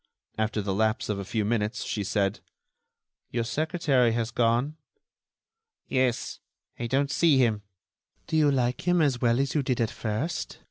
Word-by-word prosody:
After 110 -1 -1
the 100 -1 -1
lapse 110 +3 0
of 105 -2 -1
a - - -3
few 105 +2 -1
minutes 110 0 -1
she 105 - -2
said: 100 +1 0 0.9
"Your 120 0 -1
secretary 140 -3 +1
has 115 0 -1
gone." 120 +5 +1 1.1
"Yes, 130 -2 0 0.4
I 120 - -2
don't 140 +3 +1
see 155 -2 +4
him." 115 -5 +2 0.6
"Do - - -3
you 155 -2 +5
like 125 +3 0
him 175 0 +4
as 140 -6 +2
well 120 0 +3
as 135 0 0
you 150 - +2
did 130 -2 -1
at 115 -2 +1
first?" 120 +10 -3
120 Hz, 165 wpm, -27 LUFS, 110-140 Hz, 1.1 s, you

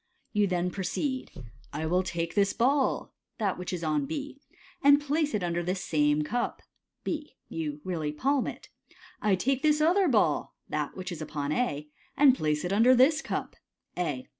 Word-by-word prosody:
Youthen 180 -4 +1
proceed, 260 - -2 0.2
" 125 - -25
I 155 +2 -2
will 180 +3 +2
take 170 -2 -3
this 200 -1 +2
ball 265 +3 +1
" - - -55
(that 200 -5 -1
which 180 - -4
is 175 -2 -4
on 150 -3 0
B), 285 -1 -5 0.2
" - - -26
and 285 +1 +7
place 295 -1 0
it 200 - -1
under 175 0 0
this 180 +2 -2
suine 150 -1 +2
cup 240 +8 -2 0.2
" - - -56
(B). 300 -4 -4
You 150 -2 -4
really 160 -5 -2
palm 270 - +1
it. - - -8 0.3
" 365 0 -23
I - - +5
take 265 +7 0
this 305 -1 +3
other 355 +5 +4
ball 210 - +2
" - - -44
(that 150 +2 -3
which 185 -1 -5
is 165 -3 -6
upon 150 -1 -3
A), 150 -8 -1 0.3
"and 280 -3 +7
place 150 - -1
it 180 - -1
under 235 +5 +6
this 270 +5 +5
cup" - - -4 0.4
(A). 150 -8 -2
185 Hz, 195 wpm, -28 LUFS, -, 0.4 s, and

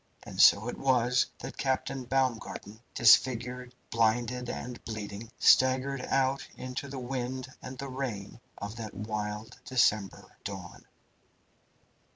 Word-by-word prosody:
And - - -1
so 105 +4 +7
it - - -5
was 125 -2 +3
that - - -8
Captain 130 -1 -1
Baumgarten, 120 -4 -1 0.2
disfigured, 125 +1 +4 0.2
blinded, 120 +2 +1
and 125 0 -6
bleeding, 110 0 -6
staggered 130 +1 +4
out 135 0 +1
into 130 +2 -5
the 135 0 -7
wind 130 0 -3
and 130 +1 -8
the 140 - -5
rain 120 -6 -5 0.2
of 100 +2 -6
that 110 -2 -6
wild 105 +1 -4
December 105 -6 +1
dawn. - - -8
125 Hz, 120 wpm, -30 LUFS, 110-130 Hz, 0.2 s, so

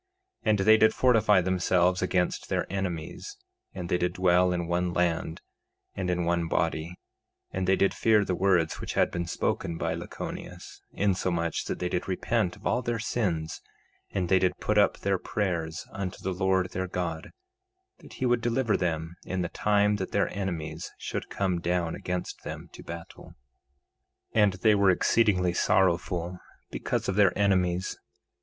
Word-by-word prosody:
3:25 - - +2
And 105 - +4
they 110 +3 +6
did 110 0 +5
fortify 110 -6 +4
themselves 90 0 +2
against 90 -1 0
their - - 0
enemies; 95 - -4 0.3
and 90 -2 -6
they 90 - +1
did 90 0 0
dwell 90 0 +3
in 85 -1 -1
one 85 +1 0
land, 85 -2 0 0.5
and 95 -2 -3
in 90 -1 0
one 85 -1 +1
body, 80 +1 -1 0.6
and 95 -1 -2
they 95 - +5
did 100 - +2
fear 110 -2 +3
the 95 - -1
words 90 -3 +2
which - - -4
had - - +3
been 85 -1 -3
spoken 85 -1 -2
by - - -1
Lachoneus, - - -7
insomuch 90 -4 0
that - - -3
they 90 - -2
did 90 0 -2
repent 95 +1 0
of 105 - -17
all 125 - +1
their 120 -1 -1
sins; 95 -8 -2 0.5
and 95 -3 -1
they 95 +1 +4
did 90 -1 +1
put 105 0 +1
up 100 - +3
their 95 -1 0
prayers 85 -5 -2
unto 95 -1 -4
the 95 - -1
Lord 95 0 +1
their 95 +1 -2
God, 85 -3 -4 0.7
that - - -14
he 130 - -3
would 120 -1 +2
deliver 120 -1 +1
them 80 -2 -1
in 95 0 -2
the 85 - -3
time 105 +1 +2
that 95 - -4
their - - 0
enemies 85 -5 -4
should - - -5
come 90 -3 -1
down 85 -1 0
against 90 0 -4
them - - -7
to - - -10
battle. 85 0 -10 1.0
3:26 110 - +4
And 100 -2 +4
they 105 +3 +3
were 100 -1 +4
exceedingly 90 -2 +3
sorrowful 90 -1 +1 0.3
because - - -2
of 95 - 0
their 100 -2 +4
enemies. 95 -3 +1
90 Hz, 170 wpm, -28 LUFS, 85-100 Hz, 1.0 s, they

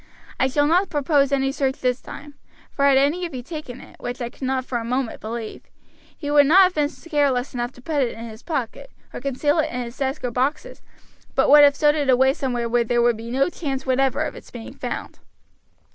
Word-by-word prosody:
I 260 - +3
shall 290 +2 +1
not 360 +5 +2
propose 285 -1 +2
any 270 -1 +1
search 270 -1 -1
this 250 -1 0
time, 290 +1 -10 0.4
for 280 - 0
had 275 -1 +5
any 290 +7 +2
of 330 - -10
you 250 - -6
taken 285 -4 -8
it, - - -15
which 245 +1 -5
I 240 -1 -4
cannot 260 0 -3
for 245 -2 -2
a - - -5
moment 250 +1 -2
believe, 225 0 -6 0.5
he 290 -2 -4
would 290 -1 +6
not 375 +6 +7
have 365 0 +2
been 295 -3 +1
careless 285 -6 -1
enough 240 0 -3
to 250 - -17
put 300 -1 0
it 240 -3 -1
in 230 - -7
his 220 0 -10
pocket, 300 - -4 0.2
or - - -6
conceal 285 +4 0
it 310 - +1
in 250 0 -3
his 235 +1 -9
desk 270 0 -3
or 245 - -2
boxes, 270 +6 -2 0.5
but 270 - +3
would 295 0 +9
have 285 -1 +6
stowed 295 0 +3
it 290 -3 -1
away 265 +1 +4
somewhere 245 -4 -2
where 240 +1 +2
there 240 +1 0
would 240 -1 +3
be 225 +1 -8
no 265 +3 +2
chance 280 -6 -4
whatever 265 +2 +1
of 300 - -5
its - - -12
being 235 -2 -9
found. - - -6
270 Hz, 230 wpm, -22 LUFS, 245-290 Hz, 0.5 s, would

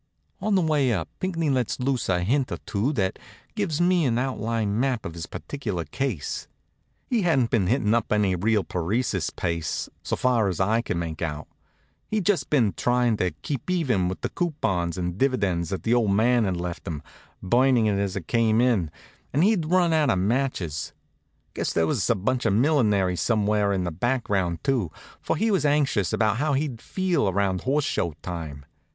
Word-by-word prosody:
On 215 -2 +1
the 185 - +3
way 150 -5 +2
up 90 -8 -2
Pinckney 165 -5 -1
lets 125 -2 0
loose 130 -3 -1
a 90 -1 +1
hint 130 +7 +1
or - - -2
two 110 +7 0
that 95 -7 -1 0.3
gives 155 -1 -1
me 175 -1 +3
an 120 -3 +1
outline 115 -4 -1
map 130 -3 0
of 85 - -5
his 85 -1 -6
particular 105 - -4
case. 105 - -3 0.6
He 240 -4 +1
hadn't 140 -10 +2
been 100 -6 +2
hittin' 115 -2 +2
up 115 - 0
any 105 -3 +2
real 105 +3 +1
paresis 95 +1 -1
pace, 85 -3 -3
so - - -2
far 120 -4 +2
as 95 - -2
I 110 +4 +2
could 100 - -3
make 80 -2 -4
out. 75 -2 -3 0.6
He'd 215 -4 -1
just 205 -3 +1
been 120 -9 +3
trying 120 -2 +2
to 90 - +1
keep 140 +2 -4
even 130 - +1
with 95 - -4
the - - -2
coupons 95 - -1
and 90 +1 -3
dividends 100 - +1
that 95 - -4
the 115 - +2
old 120 -4 +3
man 115 +3 +3
had 95 -2 -1
left 85 0 -5
him, 75 -4 -4 0.4
burnin' 120 +3 +3
it 100 -2 +1
as 100 0 -1
it 95 -5 -4
came 115 -2 +2
in, 115 -10 +2 0.4
and 150 - +2
he'd 195 -6 +2
run 175 -1 +3
out 155 -3 +3
of 110 - +2
matches. 95 - -1 0.6
Guess - - -2
there 80 - +2
was 95 +7 0
a 120 - +4
bunch 120 +5 0
of 100 - +2
millinery 105 - +3
somewhere 105 +2 +1
in 95 -2 0
the 90 - -2
background 95 -4 -1
too, 125 - +1 0.3
for - - -1
he 220 +1 +1
was 190 -6 +2
anxious 145 -10 +2
about 110 -1 +1
how 150 +3 +1
he'd 135 -5 -2
feel 180 - 0
around 95 -1 0
Horse 140 +2 +1
Show 85 - -1
time. 80 -6 -6
110 Hz, 190 wpm, -25 LUFS, 95-135 Hz, 0.6 s, a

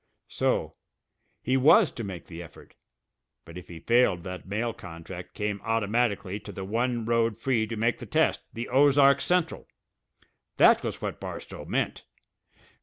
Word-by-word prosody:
So! - - 0 0.7
He 130 - +2
was 155 - +6
to 115 - -6
make 95 -4 -7
the 85 0 -9
effort; 85 - -14 0.7
but 85 +1 -12
if 90 - -9
he 85 -2 -9
failed 100 -2 +2
that 90 0 -7
mail 110 +4 -2
contract 90 0 -10
came 105 -1 -3
automatically 115 -3 0
to 105 - -10
the 95 -1 -6
one 120 +3 -1
road 115 -1 +1
free 115 -2 0
to 115 - -5
make 115 +2 0
the - - -8
test, - - +2
the 115 +1 -5
Ozark 140 +1 +5
Central! 180 -2 0 0.9
That - - +6
was - - -5
what - - -4
Barstow - - -7
meant! - - -2
115 Hz, 155 wpm, -27 LUFS, 95-125 Hz, 0.9 s, was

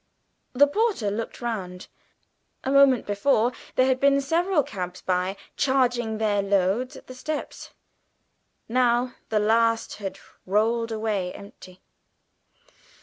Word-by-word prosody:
The 275 +3 +6
porter 335 - 0
looked 225 +4 -5
round. 190 -6 -5 0.8
A 265 - -1
moment 275 -3 +5
before 220 +3 +2 0.2
there 255 - +4
had 260 -1 +1
been 280 0 +4
several 330 +3 +1
cabs 180 -5 -6
discharging 220 +6 0
their 210 -2 +1
loads 200 +5 0
at - - -12
the 255 - -10
steps; 300 +4 -6 0.9
now 245 +1 +2 0.2
the 220 - +1
last 225 +2 +2
had 195 -2 -6 0.3
rolled 225 +4 +1
away 215 -5 -2
empty. 185 -2 -13
230 Hz, 115 wpm, -25 LUFS, 200-260 Hz, 0.9 s, The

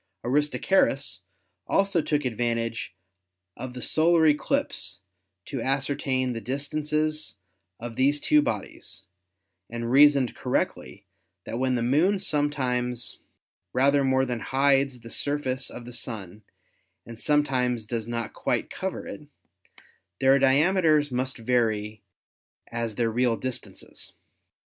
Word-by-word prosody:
Aristarchus 140 - +1 0.5
also 195 -4 +2
took 150 -2 -1
advantage 115 -3 -2 0.6
of 125 +1 -7
the 125 - -6
solar 165 +1 +3
eclipse 150 - 0 0.4
to 135 -4 -4
ascertain 135 -1 0
the 115 - -5
distances 150 +3 -2 0.4
of 115 0 -6
these 140 +4 +2
two 150 +1 +4
bodies, 105 -5 -5 0.6
and 115 0 -4
reasoned 140 -2 +5
correctly - - -2 0.4
that 115 - -4
when 130 -1 +1
the 120 - 0
Moon 155 +11 +3
sometimes 130 - -1 0.5
rather 140 +2 +3
more 130 0 +2
than 125 -2 -3
hides 135 0 +2
the 115 - -11
surface 135 -3 -1
of 120 - -9
the 125 - -9
Sun 105 -5 -6 0.6
and 115 -1 -10
some 150 -1 +3
times 125 -5 -1
does 115 0 -3
not 115 -1 -3
quite - - -1
cover - - -4
it, - - -9 0.9
their 135 +1 +5
diameters 150 +2 +3
must 130 +1 -2
vary 110 -3 0 0.7
as 115 -2 -3
their 115 0 +1
real 120 0 +1
distances. 130 +3 -7
130 Hz, 120 wpm, -26 LUFS, 120-145 Hz, 0.9 s, reasoned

